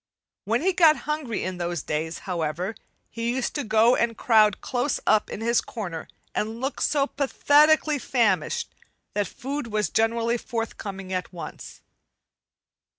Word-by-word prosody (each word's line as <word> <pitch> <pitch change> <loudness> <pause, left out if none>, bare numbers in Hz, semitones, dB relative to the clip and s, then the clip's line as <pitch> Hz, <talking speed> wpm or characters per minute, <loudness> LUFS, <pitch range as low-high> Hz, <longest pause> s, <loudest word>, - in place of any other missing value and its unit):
When 230 +7 +1
he 380 +1 +3
got 330 -4 +6
hungry 300 -8 -2
in 185 -1 -4
those 175 -3 -2
days, 160 +2 -2
however, 175 +2 -2 0.4
he 230 +1 -2
used 265 - -1
to 290 - -2
go 220 +3 +4
and 230 -1 0
crowd 215 -3 +4
close 250 +2 -1
up 215 -1 +3
in - - -6
his 235 +1 +2
corner 175 -8 -6 0.3
and 220 +2 -2
look 270 +3 -3
so 285 -2 +2
pathetically 295 +2 +3
famished 245 - 0 0.4
that 205 -2 0
food 275 0 -5
was 210 -6 -1
generally 230 +1 +1
forthcoming 200 -5 -5
at 185 0 -3
once. 175 -2 -9
230 Hz, 145 wpm, -25 LUFS, 195-270 Hz, 0.4 s, got